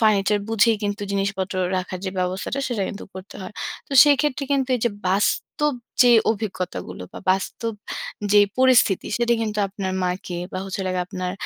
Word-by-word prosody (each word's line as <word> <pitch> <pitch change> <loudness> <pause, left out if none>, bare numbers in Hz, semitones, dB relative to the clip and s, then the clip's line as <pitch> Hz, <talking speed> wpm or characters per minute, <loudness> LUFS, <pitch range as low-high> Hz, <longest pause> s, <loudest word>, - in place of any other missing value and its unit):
Furniture 210 -1 +3
বুঝেই 225 0 +3
কিন্তু 205 +1 -2
জিনিসপত্র 195 -1 -1 0.2
রাখার 185 0 -3
যে 190 - -2
ব্যবস্থাটা 185 +8 -2
সেটা 225 -5 -1
কিন্তু 200 - -7
করতে 190 +2 -10
হয়। 185 - -8 0.3
তো - - -9
সেক্ষেত্রে 290 -1 +2
কিন্তু 270 -2 +1
এই - - -8
যে 235 - +2 0.2
বাস্তব 290 - +1 0.3
যে 245 - +6 0.2
অভিজ্ঞতাগুলো 190 - -4
বা - - -8
বাস্তব 195 +4 -1 0.6
যেই 205 -1 +7
পরিস্থিতি 255 -7 +4
সেটা 235 0 +2
কিন্তু 215 -2 -2
আপনার 195 -1 -4
মাকে 180 -1 -3
বা 185 - -3
হচ্ছে 195 0 -5
হলো 190 -1 -1
গিয়ে 180 -1 0
আপনার 185 0 -4
200 Hz, 170 wpm, -23 LUFS, 185-230 Hz, 0.6 s, যেই